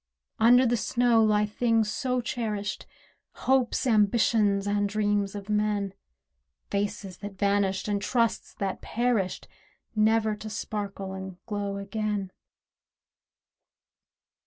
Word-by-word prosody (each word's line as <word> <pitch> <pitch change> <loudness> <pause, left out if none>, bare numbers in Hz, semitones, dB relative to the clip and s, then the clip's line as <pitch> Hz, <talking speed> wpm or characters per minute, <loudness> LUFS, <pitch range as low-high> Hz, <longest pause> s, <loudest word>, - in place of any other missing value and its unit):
Under 245 +3 +6
the 240 0 +2
snow 235 0 +3
lie 210 -1 +3
things 225 0 +1
so 250 0 -1
cherished— 215 -4 -3 0.6
Hopes, 260 0 +2
ambitions, 210 -2 +3
and 205 0 +1
dreams 205 -1 0
of 200 -1 -7
men— 210 -2 0 0.8
Faces 200 -2 -2
that 200 -1 -8
vanished, 200 -1 +1
and 205 -1 0
trusts 230 +1 0
that 195 -1 -3
perished, 230 -6 -1 0.5
Never 220 0 +3
to 215 +1 -7
sparkle 200 -2 -4
and 190 -1 -7
glow 205 -2 -3
again. 200 -1 -3
210 Hz, 110 wpm, -27 LUFS, 200-225 Hz, 0.8 s, Under